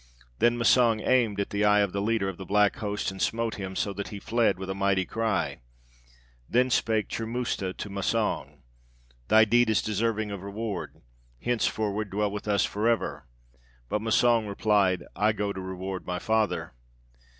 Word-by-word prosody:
Then 120 0 +3
Massang 115 -1 +4
aimed 115 -6 +2
at 100 - -2
the 105 +1 0
eye 105 0 +5
of 100 -2 0
the 100 - -2
leader 110 -1 0
of 95 -3 -4
the 95 - -7
black 105 +4 +3
host, 105 -4 -2
and 95 - -8
smote 115 0 -1
him, 95 -1 -5
so 100 - -1
that 100 +1 -5
he 100 - -7
fled 115 -3 +1
with 95 0 -6
a 95 - -2
mighty 100 -1 +1
cry. 110 - -1 0.9
Then 125 +2 +2
spake 110 -3 +1
Churmusta 115 -4 -3
to - - -5
Massang, 100 - -2 0.6
'Thy 110 0 +6
deed 120 +2 +3
is 110 - +2
deserving 110 0 -1
of 100 -2 -5
reward; 100 - -5 0.4
henceforward 110 - -1
dwell 105 +1 -1
with 105 +1 -6
us 100 -3 +2
for 105 +3 0
ever.' 115 - -1 0.6
But 105 - -1
Massang 115 0 +3
replied, 100 -3 +2
'I 105 +1 +2
go 105 -1 -2
to 95 - -6
reward 95 0 -5
my 90 0 -2
father.' 110 - 0
105 Hz, 175 wpm, -27 LUFS, 100-115 Hz, 0.9 s, Thy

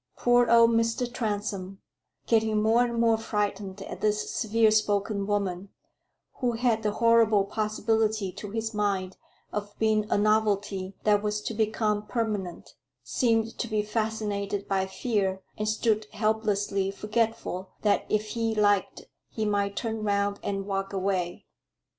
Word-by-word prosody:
Poor 245 0 +4
old 230 0 +6
Mr. 230 +1 +1
Transome, 205 -4 -3 0.5
getting 220 -2 +2
more 225 +3 +4
and 235 -1 -2
more 230 -1 +3
frightened 205 -3 -3
at - - -8
this 210 0 0
severe 220 -1 +2
spoken 205 -1 +1
woman, 200 -2 -1 0.7
who 245 -2 0
had 230 -1 +1
the 210 -1 -1
horrible 225 -3 +4
possibility 215 -1 0
to 205 +2 -8
his 225 +1 -3
mind 200 -3 -1 0.4
of 205 0 -5
being 215 -1 +1
a - - +2
novelty 205 -2 +1
that 205 -1 +3
was 210 0 -1
to 225 - -4
become 215 -1 0
permanent, 210 -7 -3 0.3
seemed 225 - +1
to 235 - -1
be 215 -2 0
fascinated 210 -2 -2
by 190 -1 0
fear, 190 -3 -1
and 215 0 -2
stood 215 0 +1
helplessly 210 -2 0
forgetful 210 -2 -2
that 205 -1 +2
if 215 0 0
he 225 -1 -1
liked 205 -2 +1 0.3
he 220 - -3
might 200 -1 0
turn 225 -2 -3
round 200 -1 0
and 195 -1 -3
walk 195 0 -3
away. 185 -2 -2
210 Hz, 140 wpm, -27 LUFS, 200-225 Hz, 0.7 s, old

